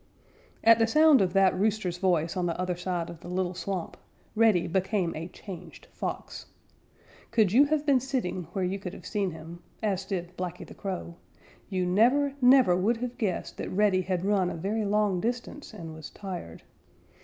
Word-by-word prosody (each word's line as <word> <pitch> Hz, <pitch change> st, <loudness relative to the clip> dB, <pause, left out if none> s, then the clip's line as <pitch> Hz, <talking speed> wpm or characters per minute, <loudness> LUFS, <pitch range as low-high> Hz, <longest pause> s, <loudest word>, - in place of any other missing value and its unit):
_ -, -, -33 dB, 0.6 s
At 230 Hz, 0 st, +7 dB
the 225 Hz, -, +4 dB
sound 305 Hz, +1 st, +6 dB
of 180 Hz, -2 st, +1 dB
that 195 Hz, -1 st, +4 dB
rooster's 195 Hz, -3 st, 0 dB
voice 175 Hz, -3 st, +1 dB
on 180 Hz, -1 st, 0 dB
the 170 Hz, -, -3 dB
other 180 Hz, -1 st, -1 dB
side 175 Hz, -1 st, -3 dB
of 170 Hz, -, -9 dB
the 175 Hz, -, -11 dB
little 180 Hz, 0 st, -1 dB
swamp, 185 Hz, -1 st, -4 dB, 0.4 s
Reddy 215 Hz, -6 st, +4 dB
became 190 Hz, 0 st, 0 dB
a 165 Hz, +2 st, -5 dB
changed 180 Hz, -3 st, -10 dB
Fox. -, -, -5 dB, 0.8 s
Could 220 Hz, -5 st, +3 dB
you 265 Hz, +7 st, +6 dB
have 300 Hz, 0 st, 0 dB
been 280 Hz, -3 st, +4 dB
sitting 245 Hz, -9 st, -3 dB
where 190 Hz, -2 st, 0 dB
you 190 Hz, +2 st, -2 dB
could 185 Hz, -1 st, -6 dB
have -, -, -12 dB
seen 205 Hz, -3 st, -1 dB
him, 165 Hz, +1 st, -10 dB, 0.2 s
as 195 Hz, -3 st, 0 dB
did 180 Hz, -3 st, -4 dB
Blacky 180 Hz, -1 st, -5 dB
the -, -, -12 dB
Crow, 180 Hz, -3 st, -5 dB, 0.5 s
you 185 Hz, -2 st, 0 dB
never, 250 Hz, +10 st, +3 dB
never 250 Hz, -7 st, +6 dB
would 210 Hz, +6 st, +1 dB
have 245 Hz, +1 st, -5 dB
guessed 195 Hz, -6 st, -2 dB
that -, -, -4 dB
Reddy 195 Hz, -1 st, +2 dB
had 185 Hz, 0 st, -2 dB
run 195 Hz, -3 st, +2 dB
a -, -, -5 dB
very 205 Hz, +6 st, -2 dB
long 205 Hz, -2 st, +1 dB
distance 245 Hz, +5 st, -4 dB
and 165 Hz, -7 st, -8 dB
was 155 Hz, -1 st, -9 dB
tired. 180 Hz, -, -8 dB
190 Hz, 190 wpm, -28 LUFS, 180-220 Hz, 0.8 s, At